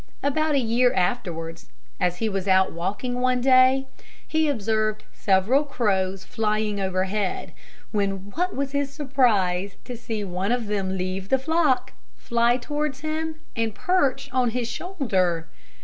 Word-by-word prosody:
About 305 +2 +1
a - - +4
year 245 +1 +3
afterwards, 175 -5 -2 0.3
as 180 -1 +1
he 225 - 0
was 195 -2 -2
out 190 0 +4
walking 205 +9 -3
one 255 0 +2
day, 260 +1 +5 0.4
he 315 -1 +2
observed 215 -3 0
several 205 +9 +3
crows 195 -8 0
flying 215 -2 -1
overhead; 190 +1 -1 0.4
when 200 -1 -2
what 360 - -1
was 275 0 -2
his 280 -1 -1
surprise 210 - +1
to 245 - -6
see 225 -2 -4
one 190 +2 -2
of 245 -2 0
them 195 -2 -1
leave 185 +1 -3
the 265 - +4
flock, 305 -1 +1 0.2
fly 235 +1 +2
towards 295 +1 -3
him, 315 +1 -2 0.2
and 225 -2 -1
perch 280 -7 +1
on 255 -2 +2
his 240 0 -2
shoulder! 200 - -1
230 Hz, 145 wpm, -24 LUFS, 195-270 Hz, 0.4 s, day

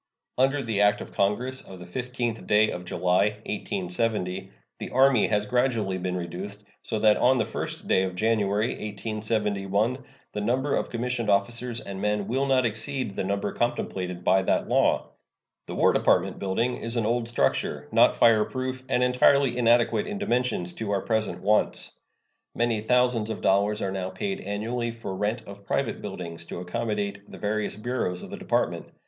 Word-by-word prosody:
Under 135 +2 +3
the 110 -4 0
act 105 0 +4
of - - -9
Congress 125 +7 0
of 95 - -11
the 90 - -10
15th 120 +3 -3
day 105 +1 +4
of 90 - -6
July, 90 +4 +1
1870, 95 -1 -2 0.3
the - - -5
Army 130 -2 +4
has 105 -1 +1
gradually 115 -5 0
been 90 0 -2
reduced, 95 +4 -6 0.2
so 110 - -3
that 105 0 +4
on 130 +1 +4
the - - +2
1st - - -5
day - - +3
of 95 -1 -2
January, 110 +1 +1
1871, 105 +2 -1 0.3
the 105 - -2
number 130 +6 +1
of - - -1
commissioned 120 -1 -2
officers 115 +4 0
and 95 -2 -7
men 105 -1 0
will 135 +3 0
not 130 -2 +3
exceed 115 0 -2
the - - -1
number 100 +1 -1
contemplated 90 -7 -2
by 95 - +4
that 95 - +1
law. - - +2 0.6
The - - -5
War - - +4
Department - - +2
building 115 +6 0
is 115 +1 -3
an 115 -3 +1
old 115 +1 0
structure, 120 - 0
not - - +5
fireproof, 130 +3 +2
and 125 -1 +2
entirely 125 +1 +4
inadequate 120 -2 +3
in 205 - -4
dimensions 125 - 0
to 110 -2 -4
our 100 -1 +1
present 110 -6 -1
wants. 105 +1 +1 0.6
Many 115 -2 +1
thousands 125 -1 +2
of 110 - -4
dollars 100 +2 +2
are 95 - -1
now 95 -1 -3
paid 195 - -3
annually 115 +4 -2
for 115 -4 -6
rent 105 +4 -1
of 100 0 -11
private - - -1
buildings 85 -1 -6
to 85 - -6
accommodate 100 +1 -3
the - - -10
various 105 0 -1
bureaus 105 -5 -2
of - - -9
the - - -5
Department. - - -1
110 Hz, 170 wpm, -26 LUFS, 100-120 Hz, 0.6 s, not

